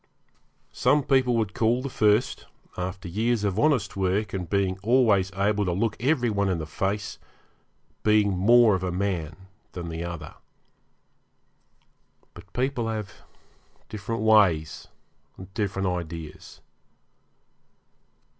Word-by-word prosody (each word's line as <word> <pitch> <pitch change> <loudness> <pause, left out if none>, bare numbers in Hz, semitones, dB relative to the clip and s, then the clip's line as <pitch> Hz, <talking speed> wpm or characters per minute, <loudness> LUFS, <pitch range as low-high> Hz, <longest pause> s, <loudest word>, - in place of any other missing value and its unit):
Some 145 -1 +2
people 130 -3 +2
would 110 -3 -1
call 120 +3 +1
the - - -2
first, 105 +1 +1 0.3
after 90 +1 -5
years 110 +5 0
of 100 0 -1
honest 135 -10 +1
work, 95 +2 -1
and 90 -4 -4
being 95 -1 0
always 105 -4 +3
able 100 +2 +1
to 90 - 0
look 110 +4 0
every 125 -2 +1
one 100 -1 0
in 90 - 0
the 80 - -4
face, 100 +6 -3 0.8
being 105 -2 +3
more 115 +4 +5
of 95 - -1
a 90 -1 -2
man 90 -4 -2 0.4
than 85 -2 -6
the 80 +1 -5
other. 85 -3 -7 2.0
But - - -14
people 125 -2 -1
have 105 -2 -4 0.8
different 110 +2 -4
ways 95 -8 +3 0.5
and 95 0 -12
different 95 -2 -2
ideas. 85 -3 -6
100 Hz, 125 wpm, -25 LUFS, 90-115 Hz, 2.0 s, more